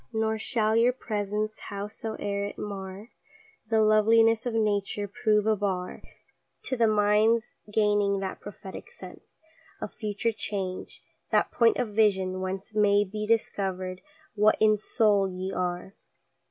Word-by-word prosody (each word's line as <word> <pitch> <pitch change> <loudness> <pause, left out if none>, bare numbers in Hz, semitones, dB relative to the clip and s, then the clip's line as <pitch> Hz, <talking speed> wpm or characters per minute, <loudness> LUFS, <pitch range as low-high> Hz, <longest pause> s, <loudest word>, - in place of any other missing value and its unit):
Nor 220 -1 0
shall 220 -2 +1
your 235 +2 +4
presence, 215 -2 -3
howsoeŌĆÖer 205 -1 -4
it - - -13
mar 195 +1 -7 0.6
The 220 -1 +3
loveliness 225 +2 +4
of 235 - -2
nature, 205 -1 0
prove 210 +1 +1
a 220 0 +3
bar 190 -3 -3 0.6
To 260 - -1
the 235 -2 +3
mindŌĆÖs 215 +1 +3 0.2
gaining 205 -2 +2
that 195 -1 -4
prophetic 200 - -9
sense 480 - -13 0.4
Of - - -6
future 215 +1 -2
change 195 -4 -5 0.3
that - - +2
point 230 -1 +3
of 240 - -1
vision, 190 -3 +2
whence 190 +2 -5
May 205 -1 +4
be 210 +2 -5
discoverŌĆÖd 190 -4 -1 0.3
what 215 0 +3
in 215 0 +5
soul 205 -2 +2
ye 185 +1 -5
are. 180 +1 -3
210 Hz, 135 wpm, -27 LUFS, 195-220 Hz, 0.6 s, in